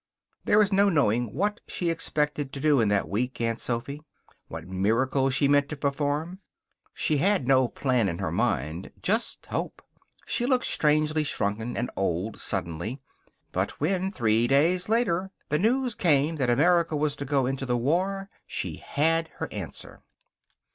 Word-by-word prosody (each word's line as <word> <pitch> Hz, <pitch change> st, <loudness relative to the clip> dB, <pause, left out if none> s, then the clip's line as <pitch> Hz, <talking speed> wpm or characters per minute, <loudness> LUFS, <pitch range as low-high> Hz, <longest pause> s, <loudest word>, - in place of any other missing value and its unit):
There 210 Hz, -, +4 dB
is 200 Hz, 0 st, -1 dB
no 200 Hz, +1 st, +4 dB
knowing 120 Hz, -, +1 dB
what 205 Hz, +7 st, -1 dB
she 175 Hz, -2 st, -1 dB
expected 150 Hz, -3 st, -2 dB
to 140 Hz, -, -4 dB
do 150 Hz, -1 st, +3 dB
in 110 Hz, -, +2 dB
that 100 Hz, -4 st, +1 dB
week, 120 Hz, +9 st, -2 dB
Aunt 115 Hz, -1 st, -1 dB
Sophy; 125 Hz, +5 st, -3 dB, 0.5 s
what -, -, -8 dB
miracle 115 Hz, +8 st, +1 dB
she 140 Hz, +1 st, +3 dB
meant 145 Hz, 0 st, +3 dB
to 150 Hz, -, -5 dB
perform. 145 Hz, +5 st, -2 dB, 0.5 s
She 155 Hz, -, 0 dB
had 190 Hz, -4 st, +2 dB
no 130 Hz, -2 st, +4 dB
plan 125 Hz, -4 st, 0 dB
in 85 Hz, -, -4 dB
her -, -, -3 dB
mind. 80 Hz, +7 st, -1 dB
Just 220 Hz, +5 st, 0 dB
hope. -, -, -4 dB, 0.4 s
She 240 Hz, -, 0 dB
looked 255 Hz, -2 st, +2 dB
strangely 155 Hz, 0 st, +2 dB
shrunken 110 Hz, -4 st, -2 dB
and 120 Hz, -, -2 dB
old, 95 Hz, +3 st, -2 dB
suddenly. 85 Hz, -, -2 dB, 0.5 s
But -, -, -2 dB
when, 185 Hz, +5 st, 0 dB
three 115 Hz, -, +2 dB
days 170 Hz, +8 st, +2 dB
later, 195 Hz, -5 st, +1 dB, 0.2 s
the 150 Hz, -, +1 dB
news 245 Hz, +5 st, +1 dB
came 155 Hz, -4 st, +2 dB
that 130 Hz, -4 st, 0 dB
America 165 Hz, +5 st, +3 dB
was 150 Hz, 0 st, 0 dB
to 140 Hz, -, -4 dB
go 140 Hz, -1 st, +1 dB
into 135 Hz, +1 st, -3 dB
the 125 Hz, -1 st, +1 dB
war 185 Hz, +10 st, 0 dB, 0.2 s
she -, -, -4 dB
had 165 Hz, +3 st, 0 dB
her -, -, -4 dB
answer. -, -, -8 dB
145 Hz, 160 wpm, -26 LUFS, 120-170 Hz, 0.5 s, There